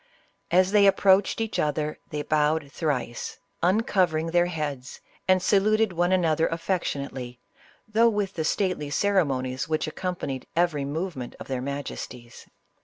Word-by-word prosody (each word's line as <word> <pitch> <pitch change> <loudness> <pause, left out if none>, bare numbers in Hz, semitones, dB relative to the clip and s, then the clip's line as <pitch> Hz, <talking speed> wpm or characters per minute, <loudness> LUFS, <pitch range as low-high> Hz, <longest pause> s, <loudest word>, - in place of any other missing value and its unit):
As 185 +2 +4
they 205 -1 +6
approached 195 +1 +4
each 225 -1 -2
other, 150 0 -1
they 150 0 -3
bowed 150 -1 +1
thrice, 135 -8 -3 0.2
uncovering 180 -4 +2
their 175 0 +3
heads, 145 -7 -4 0.3
and 185 -1 +4
saluted 215 0 +3
one 175 +1 +1
another 165 -4 +2
affectionately, 140 -8 -3 0.5
though 225 +2 +4
with 205 -3 -1
the 160 - -2
stately 180 -3 0
ceremonies 140 -8 0
which 155 -1 0
accompanied 155 -5 -4
every 165 -5 +1
movement 145 -3 -4
of - - -8
their 130 -2 -2
majesties. 130 -3 -6
165 Hz, 130 wpm, -26 LUFS, 140-190 Hz, 0.5 s, they